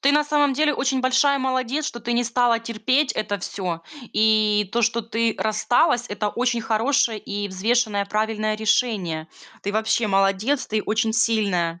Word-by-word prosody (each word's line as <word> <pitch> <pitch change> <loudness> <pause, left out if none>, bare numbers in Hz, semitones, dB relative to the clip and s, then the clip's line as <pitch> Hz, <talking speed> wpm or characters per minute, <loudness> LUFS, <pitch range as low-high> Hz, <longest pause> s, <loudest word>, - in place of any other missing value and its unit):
Ты 280 +1 +3
на 295 0 +3
самом 295 -1 +2
деле 300 +3 +2
очень 265 -1 0
большая 260 +2 +3
молодец, 260 +2 -1
что 240 - -6
ты 240 - -3
не 240 +1 +1
стала 240 -1 +2
терпеть 255 +4 0
это 205 -1 -3
всё. 180 -2 -5 0.3
И 215 -2 +3
то, 235 - +1
что 230 +1 +1
ты 230 0 -1
рассталась- 240 +4 +1
это 210 +1 -2
очень 240 +2 -1
хорошее 230 +2 +1
и 205 0 -5
взвешенное 210 +2 0
правильное 215 +1 -1
решение. 210 -7 0 0.4
Ты, 200 - -3
вообще, 220 +1 +1
молодец, 195 +7 +1
ты 215 -1 -1
очень 220 +1 0
сильная. 200 -7 0
225 Hz, 165 wpm, -22 LUFS, 210-255 Hz, 0.4 s, Ты